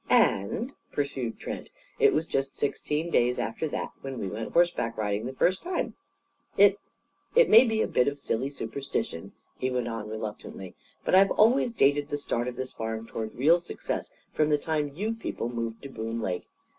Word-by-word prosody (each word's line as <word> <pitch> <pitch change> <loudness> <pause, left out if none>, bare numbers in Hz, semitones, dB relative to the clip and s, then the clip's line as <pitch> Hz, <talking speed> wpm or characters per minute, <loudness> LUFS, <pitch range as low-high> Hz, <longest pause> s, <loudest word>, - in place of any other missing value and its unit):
"And," 220 - +2 0.2
pursued 135 -5 -2
Trent, - - -6 0.3
"it - - +6
was 155 +2 +1
just 135 -3 -1
sixteen 150 +3 -1
days 125 +1 +3
after 160 - -2
that - - -3
when 135 -1 -5
we 100 - -3
went 110 +4 -5
horseback 170 -9 +2
riding 105 +1 -1
the 130 - -5
first 185 +7 +2
time. 360 0 -2 0.6
It - - +6 0.6
it - - +6
may 230 +4 +10
be 220 -2 +1
a - - 0
bit 125 - +2
of 140 0 0
silly 135 -1 -1
superstition," 120 -8 -4 0.3
he 130 - 0
went 125 -2 -1
on 115 -2 -4
reluctantly, 105 -3 -6 0.3
"but - - 0
I've 195 +1 +7
always 235 +3 +4
dated 145 -8 +3
the 145 - -1
start 120 -4 -1
of 125 - -4
this 130 +1 -5
farm 110 0 -4
toward 110 -1 -5
real 160 +7 +5
success 175 - -4 0.2
from 155 0 +2
the 150 - +4
time 150 0 -1
you 215 +6 -1
people 225 - -4
moved 115 -1 -4
to 140 - -6
Boone 115 -2 -4
Lake. 90 -5 -3
135 Hz, 185 wpm, -28 LUFS, 115-160 Hz, 0.6 s, may